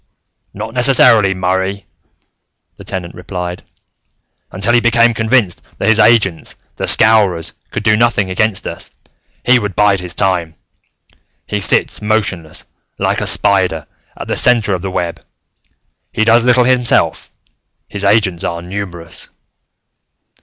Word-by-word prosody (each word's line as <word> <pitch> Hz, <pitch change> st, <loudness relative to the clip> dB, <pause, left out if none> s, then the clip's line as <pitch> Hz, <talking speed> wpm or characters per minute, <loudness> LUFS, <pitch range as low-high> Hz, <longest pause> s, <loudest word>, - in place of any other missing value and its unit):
"Not 110 Hz, +3 st, -7 dB
necessarily, 115 Hz, -6 st, +4 dB
Murray," 95 Hz, +2 st, -2 dB, 0.9 s
the -, -, -13 dB
Tenant 90 Hz, -2 st, -6 dB
replied. 90 Hz, -1 st, -6 dB, 0.9 s
"Until 100 Hz, +5 st, 0 dB
he 120 Hz, -, +5 dB
became 120 Hz, 0 st, +3 dB
convinced 110 Hz, -4 st, 0 dB, 0.2 s
that 100 Hz, -, 0 dB
his 110 Hz, 0 st, +3 dB
agents, 105 Hz, -8 st, +2 dB, 0.2 s
the -, -, -3 dB
Scowrers, 100 Hz, -7 st, +3 dB, 0.2 s
could 110 Hz, -, -5 dB
do 105 Hz, 0 st, +3 dB
nothing 105 Hz, -4 st, +1 dB
against 105 Hz, +2 st, -1 dB
us, -, -, -8 dB, 0.6 s
he 125 Hz, 0 st, +4 dB
would 105 Hz, -4 st, -5 dB
bide 100 Hz, -1 st, +2 dB
his 90 Hz, -1 st, -6 dB
time. 90 Hz, -4 st, -1 dB, 0.9 s
He 105 Hz, -, -3 dB
sits 90 Hz, -, +1 dB
motionless, 100 Hz, -7 st, -3 dB, 0.3 s
like -, -, -1 dB
a -, -, -2 dB
spider, 95 Hz, -6 st, +3 dB, 0.3 s
at -, -, -8 dB
the -, -, -2 dB
center 115 Hz, -5 st, +2 dB
of 90 Hz, -, -3 dB
the 95 Hz, -, -4 dB
web; 85 Hz, -2 st, -4 dB, 0.9 s
he 110 Hz, -, 0 dB
does 115 Hz, +1 st, +4 dB
little 125 Hz, 0 st, +4 dB
himself; 125 Hz, -1 st, 0 dB, 0.6 s
his 100 Hz, -1 st, -5 dB
agents 100 Hz, -4 st, +1 dB
are 85 Hz, 0 st, -4 dB
numerous. 90 Hz, -3 st, -7 dB
100 Hz, 130 wpm, -14 LUFS, 90-110 Hz, 0.9 s, he